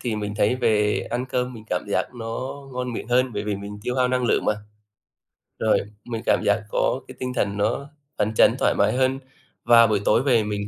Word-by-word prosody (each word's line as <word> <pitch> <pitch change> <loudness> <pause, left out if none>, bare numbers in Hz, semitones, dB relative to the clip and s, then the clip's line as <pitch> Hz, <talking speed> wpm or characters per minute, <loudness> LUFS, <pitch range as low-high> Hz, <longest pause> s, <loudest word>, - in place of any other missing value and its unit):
thì 115 -3 -2
mình 105 -1 -4
thấy 105 +3 +2
về 105 -4 +2
ăn 125 +1 -1
cơm 125 0 -2
mình 110 -2 -11
cảm 90 - -1
giác 100 - -1
nó 115 +2 -5 0.2
ngon 125 0 -3
miệng 115 - -6
hơn 125 +1 +2
bởi 105 -1 -3
vì 105 -1 -2
mình 100 +1 -8
tiêu 125 - -2
hao 125 -1 +3
năng 125 0 0
lượng - - +2
mà. - - +3 1.1
Rồi, 110 - +3 0.3
mình 115 -2 -4
cảm - - +2
giác 100 +2 +3
có - - 0
cái - - -11
tinh 125 0 -3
thần 100 -4 -1
nó 115 +7 -1 0.3
phấn 110 +1 0
chấn - - +5
thoải - - +3
mái 110 - +3
hơn 130 +1 +1 0.5
và 115 -1 +7
buổi 105 -2 +1
tối 115 - +3
về 120 -5 +3
mình 105 -1 -3
115 Hz, 225 wpm, -23 LUFS, 105-125 Hz, 1.1 s, và